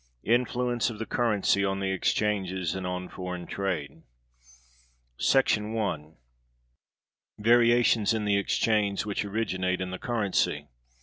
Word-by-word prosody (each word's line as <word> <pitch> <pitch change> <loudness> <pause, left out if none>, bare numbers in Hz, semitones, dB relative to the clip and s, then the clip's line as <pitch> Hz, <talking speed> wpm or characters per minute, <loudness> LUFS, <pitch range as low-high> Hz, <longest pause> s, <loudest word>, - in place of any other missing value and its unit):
Influence 120 0 +1
Of 115 - -7
The 115 - -4
Currency 105 -3 +1
On 95 0 0
The 95 -1 -1
Exchanges 95 -2 0
And 95 -1 -4
On 90 0 -4
Foreign 90 -2 -6
Trade. 90 -8 -4 1.2
§ 110 -5 +2
1. 80 -8 -3 1.2
Variations 120 -1 +4
in 110 -2 -1
the 100 -1 +2
exchange, 105 0 +1
which 105 -1 -2
originate 95 -3 -1
in 95 0 -4
the 95 - -5
Currency. 100 - -1
100 Hz, 120 wpm, -27 LUFS, 95-115 Hz, 1.2 s, Variations